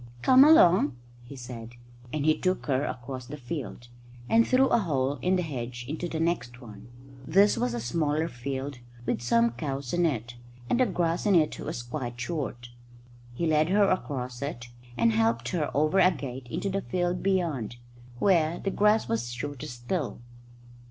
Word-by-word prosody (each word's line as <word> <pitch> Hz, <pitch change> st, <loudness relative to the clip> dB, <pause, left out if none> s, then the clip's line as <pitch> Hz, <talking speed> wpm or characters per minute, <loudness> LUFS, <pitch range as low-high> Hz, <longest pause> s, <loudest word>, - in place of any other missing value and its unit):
"Come 260 Hz, +1 st, +8 dB
along," 180 Hz, -, +6 dB, 0.3 s
he 120 Hz, +3 st, -11 dB
said, 120 Hz, -2 st, -8 dB, 0.4 s
and 150 Hz, -2 st, -2 dB
he 155 Hz, 0 st, +4 dB
took 185 Hz, 0 st, -1 dB
her 135 Hz, -2 st, +1 dB
across 125 Hz, 0 st, -6 dB
the 150 Hz, -, -7 dB
field, 125 Hz, -3 st, -6 dB, 0.4 s
and 230 Hz, -, +4 dB
through 265 Hz, +1 st, +4 dB
a -, -, +4 dB
hole 140 Hz, -7 st, -1 dB
in 185 Hz, +1 st, +2 dB
the 180 Hz, -, 0 dB
hedge 125 Hz, -5 st, -5 dB
into 160 Hz, +4 st, -4 dB
the 160 Hz, -, -3 dB
next 125 Hz, -8 st, -1 dB
one. 110 Hz, -3 st, -12 dB, 0.4 s
This 200 Hz, +6 st, +5 dB
was 125 Hz, -1 st, -1 dB
a -, -, -2 dB
smaller 150 Hz, +6 st, 0 dB
field 135 Hz, +1 st, -5 dB, 0.3 s
with -, -, -1 dB
some 115 Hz, -1 st, +3 dB
cows 135 Hz, +1 st, -4 dB
in 175 Hz, -1 st, +3 dB
it, 120 Hz, -4 st, -4 dB, 0.3 s
and 240 Hz, -, +1 dB
the 255 Hz, -, +4 dB
grass 175 Hz, 0 st, 0 dB
in 200 Hz, -, +4 dB
it 155 Hz, -3 st, +2 dB
was 120 Hz, -, -5 dB
quite 120 Hz, -2 st, -5 dB
short. 125 Hz, -4 st, -4 dB, 0.7 s
He 170 Hz, -, -1 dB
led 155 Hz, 0 st, +2 dB
her 200 Hz, +1 st, +4 dB
across 125 Hz, -8 st, -3 dB
it, 120 Hz, -4 st, -5 dB, 0.3 s
and 115 Hz, 0 st, +4 dB
helped 115 Hz, +1 st, +1 dB
her 155 Hz, -5 st, -1 dB
over 155 Hz, +6 st, +3 dB
a 185 Hz, -, +7 dB
gate 130 Hz, -7 st, -6 dB
into 180 Hz, +4 st, -2 dB
the 195 Hz, +1 st, -1 dB
field 180 Hz, -1 st, -1 dB
beyond, 170 Hz, -, -1 dB, 0.4 s
where 170 Hz, +1 st, +2 dB
the 195 Hz, -, -3 dB
grass 210 Hz, +2 st, +3 dB
was 115 Hz, +1 st, -1 dB
shorter 140 Hz, +2 st, -5 dB
still. 120 Hz, +5 st, -4 dB
145 Hz, 175 wpm, -27 LUFS, 120-175 Hz, 0.7 s, Come